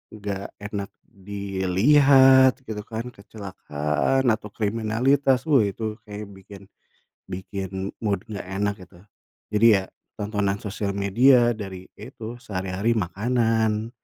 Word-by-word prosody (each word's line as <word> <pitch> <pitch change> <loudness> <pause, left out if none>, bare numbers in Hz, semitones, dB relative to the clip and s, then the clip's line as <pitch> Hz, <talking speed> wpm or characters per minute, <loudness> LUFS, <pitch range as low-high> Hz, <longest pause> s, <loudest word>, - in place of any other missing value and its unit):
nggak 100 -2 -5
enak 100 -1 -5 0.2
dilihat 125 +8 +4
gitu 105 -1 -5
kan, 115 +2 -5
kecelakaan, 100 - -2
atau 110 -2 +1
kriminalitas. 120 +7 +1
Wih, 125 -10 +4
itu, 110 +1 -4
kayak 105 -1 -8
bikin, 100 0 -13 0.7
bikin 95 +1 -5
mood 100 -4 -1
nggak 100 -3 -6
enak 100 +2 -1
gitu. 85 - -19 0.5
Jadi, 105 +2 +4
ya - - -3 0.3
tontonan 105 -1 -1
sosial 100 -1 -3
media 120 +5 +4
dari, 95 -5 -6 0.2
ya - - -9
itu 115 +2 -7
sehari-hari 95 +1 -1
makanan, 110 +2 0
105 Hz, 115 wpm, -24 LUFS, 100-115 Hz, 0.7 s, dilihat